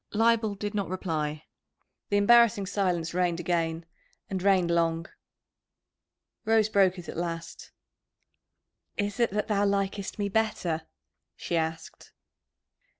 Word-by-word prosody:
Leibel 225 -1 +3
did 205 +1 -4
not 200 -4 -2
reply. 155 -5 -3 0.6
The 205 - +2
embarrassing 210 -1 +5
silence 180 -4 -1
reigned 175 -1 0
again, 165 -1 -1 0.5
and 190 -1 -2
reigned 185 -3 +3
long. 165 -1 +1 1.4
Rose 220 -1 +3
broke 195 -3 +3
it 175 - -9
at - - -6
last. 165 -1 -5 1.3
"Is 205 +1 -2
it 235 - +3
that 210 +1 -2
thou 205 -2 +1
likest 200 0 -1
me 205 -1 -1
better?" 185 -7 -1 0.5
she 175 - -3
asked. 160 0 -4
190 Hz, 120 wpm, -28 LUFS, 170-205 Hz, 1.4 s, embarrassing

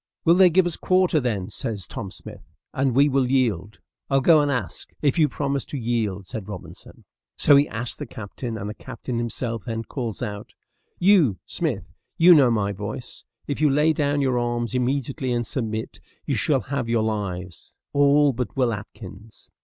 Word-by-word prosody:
"Will 165 - +6
they 185 0 +6
give 180 +2 +3
us 175 -2 -1
quarter, 185 -3 +2
then?" 105 -8 -2
says 105 -5 -3
Tom - - -6
Smith, - - -10 0.3
"and 130 -2 0
we 140 +2 +5
will 135 -3 +1
yield." 110 -7 0 0.3
"I'll 135 -1 +3
go 155 +3 +5
and 145 -1 +1
ask, 120 - -4
if 145 +2 +2
you 150 -2 +4
promise 140 0 -2
to 145 - -6
yield," 110 -5 -2
said 105 +1 -7
Robinson: 105 -4 -10 0.3
so 145 - +6
he 140 +1 +5
asked 115 +1 -3
the 145 - -5
captain, 110 +2 -6
and 100 -1 -5
the 105 - -4
captain 120 0 -6
himself 115 -1 -4
then 115 -1 -3
calls 115 -4 -5
out, 105 -1 -6 0.4
"You, 175 - +4
Smith, - - -3 0.2
you 175 +2 +8
know 140 -6 +6
my 105 -3 0
voice; 105 +5 -7 0.2
if 145 +1 -4
you 150 - +5
lay 150 +3 +3
down 145 -1 0
your 130 -3 +1
arms 120 0 -2
immediately 130 0 -1
and 120 -1 0
submit, 110 -2 -4 0.2
you - - -1
shall 140 -4 +1
have 125 0 -3
your 115 -2 +2
lives, 95 -5 -4 0.2
all 145 0 +4
but 125 +2 -4
Will 125 -3 +2
Atkins." 105 0 -10
125 Hz, 185 wpm, -24 LUFS, 110-140 Hz, 0.4 s, you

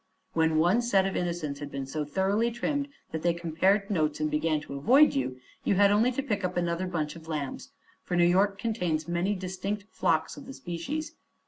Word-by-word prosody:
When 160 -1 +2
one 175 +9 +4
set 200 -5 +3
of 195 - -2
innocents 170 -5 -2
had 145 -1 -6
been 140 -1 -4
so 150 +3 -3
thoroughly 195 +9 +1
trimmed 280 +4 -2 0.2
that 160 - -3
they 170 0 +2
compared 185 +5 +1
notes 155 -5 0
and 155 0 0
began 155 0 +1
to 145 - -9
avoid 250 - +5
you, 130 -1 -2 0.2
you - - +2
had 200 +1 +5
only 220 +5 +4
to 275 - -2
pick 210 -7 -2
up 180 0 -2
another 175 +1 0
bunch 155 -4 -2
of 165 -1 -12
lambs, 155 - -4 0.3
for 175 - -2
New 175 - +5
York 195 +3 +3
contains 180 -8 -1
many 175 +4 0
distinct 190 +2 -4
flocks 160 - 0
of 280 -3 -10
the 270 - -7
species. 285 - -5
175 Hz, 205 wpm, -28 LUFS, 160-205 Hz, 0.3 s, avoid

